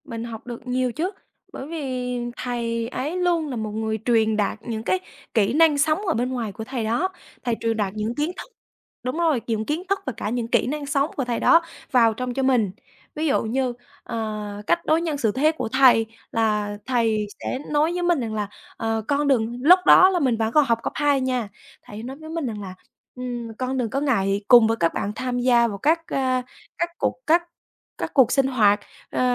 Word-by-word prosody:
Mình 230 0 -6
học 230 0 -8
được 240 0 -8
nhiều 250 0 0
chứ. 330 +10 -2 0.4
Bởi 265 - -7
vì 255 -6 -3 0.2
thầy 230 -2 -2
ấy 290 +7 -3
luôn 345 -4 +1
là 260 - -4
một 215 -2 -3
người 220 0 -2
truyền 220 -3 +3
đạt 210 0 0
những 225 -1 -5
cái 370 - +1 0.3
kỹ 220 -1 +2
năng 310 -1 +5
sống 315 +8 +1
ở 325 - +2
bên 245 +2 -1
ngoài 240 -5 -3
của 220 - -7
thầy 245 0 -4
đó, 235 +13 0 0.3
thầy 240 -2 0
truyền 225 -1 -1
đạt 200 -3 -1
những 215 +2 -3
kiến 300 +5 -1
thức - - -9 0.5
đúng 255 +5 -3
rồi, 320 -8 +2
những 220 -2 -1
kiến 310 +7 -2
thức 395 0 +2
và 260 - -3
cả 210 - -3
những 235 0 -2
kỹ - - +2
năng 295 +2 -3
sống 280 +2 0
của 270 - 0
thầy 240 -1 -1
đó 335 - +6 0.3
vào 230 -3 +5
trong 250 +2 -4
cho 270 - -1
mình. 245 -7 +2 0.4
Ví 310 +1 -1
dụ 280 - +2
như, 250 +2 -1 0.3
ờ, 220 -2 -4 0.3
cách 170 +1 +1
đối 315 +1 +3
nhân 320 -4 -2
xử 225 -6 +1
thế 285 +7 +3
của 260 -7 -4
thầy 245 -3 +5 0.3
là 210 -2 0
thầy 225 -4 +1
sẽ 255 - -3
nói 305 +3 +2
với 355 0 -2
mình 345 -3 +2
rằng 225 -3 -3
là 210 -1 -2 0.3
"Ờ, 225 0 -1
con 290 0 +1
đừng" 240 -3 +1
lúc 360 +5 +8
đó 370 - +8
là 370 -2 +1
mình 255 -7 +1
vẫn 220 0 0
còn 300 -2 +5
học 230 -2 +1
cấp - - -3
2 285 -2 +2
nha, 250 -4 -1 0.3
thầy 205 - -11
ấy 220 - -7
nói 265 +3 -7
với 315 +1 -11
mình 325 -2 -3
rằng 215 -3 -5
là 190 -2 -7 0.4
"Ừm, 240 -2 -5
con 260 +1 -2
đừng 245 -3 -1
có 270 - -1
ngại 200 -8 +1
cùng 240 -3 +8
với 225 +1 0
các 165 -4 +1
bạn - - -2
thân 205 - -3
tham 250 0 -2
gia 240 -1 +4
vào 205 -3 -5
các, 325 - +1
a, 255 -2 0 0.4
các 340 - 0
cuộc - - 0
các 340 +2 +4 0.5
các - - -4
cuộc 255 -4 +5
sinh 270 -1 +3
hoạt." 215 -6 +3 0.3
Ờ, - - -2
250 Hz, 230 wpm, -23 LUFS, 225-290 Hz, 0.5 s, lúc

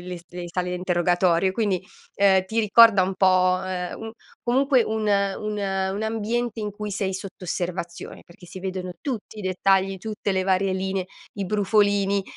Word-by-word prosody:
le 180 -1 -5
s - - -17
le 180 0 -6
sale 180 +1 -2
a - - -1
interrogatorio, 180 0 +2
e - - -7
quindi, 200 -3 0 0.4
uhm, 190 -2 +4
ti 225 +4 0
ricorda 215 -1 +6
un 190 +1 -1
po', 185 -1 +3
ehm, 180 -1 -4
un 225 0 -7 0.3
comunque 260 +1 +3
un 220 0 -2
un 200 +1 0
un 195 0 -1
ambiente 225 +1 -2
in 210 -1 -3
cui 210 +1 -6
sei 195 -1 -2
sotto 190 -1 -8
osservazione, 175 0 -5
perché 175 0 -16
si 185 - -9
vedono 185 -1 -4
tutti 230 -5 -5
i 210 - -6
dettagli, 190 +1 +1
tutte 210 -1 -3
le 190 0 +1
varie 190 0 +1
linee, 190 0 -2 0.3
i 200 - -3
brufolini, 200 -1 +2
195 Hz, 180 wpm, -24 LUFS, 185-210 Hz, 0.4 s, ricorda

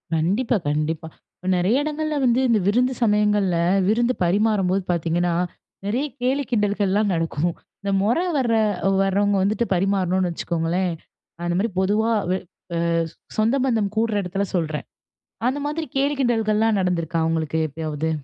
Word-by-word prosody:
கண்டிப்பா, 205 +9 +1
கண்டிப்பா. 155 +2 -1 0.3
இப்ப 185 - -9
நெறைய 205 +10 +2
இடங்கள்ல 305 0 -2
வந்து 240 0 +3
இந்த 220 -2 +4
விருந்து 250 +5 +2
சமயங்கள்ல, 210 -4 +2 0.3
விருந்து 240 +3 +2
பரிமாறும்போது 195 0 +2
பார்த்தீங்கன்னா, 170 +1 0 0.5
நெறைய 245 +8 0 0.2
கேலி 270 +3 +1
கிண்டல்கள்லாம் 205 -2 +1
நடக்கும். 165 0 0 0.3
இந்த 200 - -2
மொற 230 +9 +2 0.2
வர்ற 235 -4 +2 0.5
வர்றவங்க 200 +1 +2
வந்துட்டு 215 +4 +1
பரிமாறணோன்னு 185 -1 +1
வச்சுக்கோங்களேன். 170 +2 -1 0.5
அந்த 175 - 0
மாரி 225 +3 +1
பொதுவா 210 +4 +2 0.2
வ - - +3 0.4
அ - - 0 0.6
சொந்தபந்தம் 225 -3 +1
கூடுற 225 -1 +1
எடத்துல 195 +2 -2
சொல்றேன். 155 -3 -2 0.6
அந்த 265 +3 0
மாதிரி 310 +2 -2
கேலி, 280 +2 +2
கிண்டல்கள்லாம் 225 -3 +2
நடந்துருக்கா 170 -2 0
உங்களுக்கு 160 -1 -1
எப்பயாவது? 155 +1 -3
200 Hz, 130 wpm, -23 LUFS, 175-230 Hz, 0.6 s, இந்த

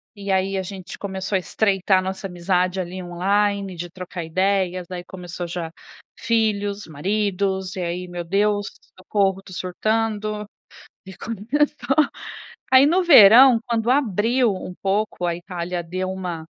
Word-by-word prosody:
e 200 -1 -4
aí 190 +1 +1
a 190 - -2
gente 190 -1 -8
começou 195 0 -4
a - - +3
estreitar 195 -1 +1
a - - -1
nossa 190 +2 -5
amizade 180 +1 0
ali 185 +1 -5
online, 195 +2 0
de 175 +1 -6
trocar 180 -1 -7
ideias, 185 +1 0
aí 180 -1 -6
começou 175 -1 -7
já 170 -1 -4 0.5
filhos, 210 -4 0
maridos, 190 +3 -1
e 185 - -4
aí 175 +1 -3
meu 175 -1 -5
Deus, 205 +3 +1 0.3
socorro, 195 0 0
estou 190 -2 -11
surtando. 215 +2 -2 0.6
E 190 - -10
começou 265 +5 -1 0.8
aí 260 +1 +8
no 360 +5 +3
verão 240 - +8
quando 230 0 0
abriu 240 -2 +2
um 185 -1 -7
pouco 195 -1 -1
a 170 - -1
Itália 175 0 -5
deu 185 +2 -4
uma 180 -4 -5
190 Hz, 145 wpm, -22 LUFS, 180-210 Hz, 0.8 s, aí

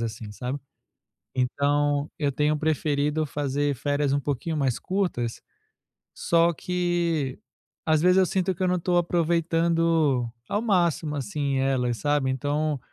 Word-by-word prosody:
assim, 110 -2 -5
sabe 125 +5 -4 0.8
Então 145 +3 +1
eu 145 -2 +1
tenho 150 +2 +1
preferido 150 0 0
fazer 145 0 -1
férias 145 +1 0
um 145 - +2
pouquinho 145 +3 -2
mais 135 -4 +1
curtas 175 -12 -2 0.7
só 170 0 +3
que 170 -6 -1 0.5
às 155 -2 +3
vezes, 180 +2 +4
eu 185 - +5
sinto 190 +1 0
que 180 - -11
eu 185 - +2
não 180 - +2
estou 175 0 +1
aproveitando 165 -5 +1 0.2
ao 205 - -1
máximo, 170 -8 +1
assim, 145 -2 -2
elas, 130 -3 +1
sabe. 145 -1 +1
Então, 145 +2 -1
150 Hz, 135 wpm, -25 LUFS, 140-170 Hz, 0.8 s, eu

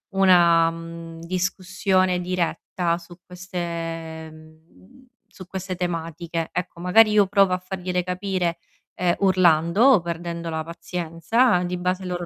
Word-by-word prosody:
una, 175 -3 +5
mhmm, 165 0 -9
discussione 185 +1 0
diretta 175 -1 -2
su 175 0 -14
queste 165 -3 -6
mhmm, 155 - -19 0.2
su 185 - -13
queste 190 0 -5
tematiche. 165 -1 -4
Ecco, 180 -1 -5
magari 215 +5 +5
io 210 -2 +4
provo 195 -1 +3
a 180 - 0
fargliele 180 -1 -3
capire, 180 -1 -2 0.4
ehm, 180 -1 +1
urlando 180 0 +3
o 265 -9 +6
perdendo 170 0 -5
la 160 -1 -3
pazienza, 175 +6 0
di 180 0 -3
base 180 +1 -2
loro 175 -1 -4
175 Hz, 125 wpm, -23 LUFS, 165-185 Hz, 0.4 s, o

